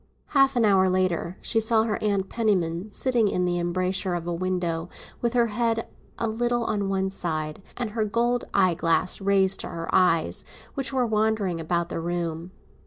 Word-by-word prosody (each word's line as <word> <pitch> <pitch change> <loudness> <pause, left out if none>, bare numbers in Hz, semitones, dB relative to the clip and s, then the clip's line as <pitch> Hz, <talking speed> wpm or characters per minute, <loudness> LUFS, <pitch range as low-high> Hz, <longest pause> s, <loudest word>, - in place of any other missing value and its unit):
Half 275 -2 +4
an 235 -2 +3
hour 190 -2 +4
later 185 -1 0
she 225 - +2
saw 220 0 +3
her 220 -2 -2
Aunt 200 -2 +1
Penniman 190 -5 0
sitting 235 0 +1
in 180 -2 0
the 175 0 0
embrasure 185 +1 -1
of 170 -1 -4
a 175 - -2
window, 175 -1 -2 0.3
with 235 0 0
her 240 -1 +4
head 230 0 0 0.3
a 230 - -1
little 240 +2 0
on 205 -3 -1
one 190 0 0
side, 155 -3 -3 0.2
and 240 -3 -2
her 220 0 0
gold 235 +3 0
eye 185 -3 +3
glass 165 +3 0
raised 195 -1 +3
to - - -3
her 165 0 -5
eyes, 175 -3 +3 0.3
which 270 -1 -2
were 260 -2 +1
wandering 215 -5 0
about 170 +1 -1
the - - -3
room. 170 0 -3
190 Hz, 180 wpm, -25 LUFS, 175-225 Hz, 0.3 s, Half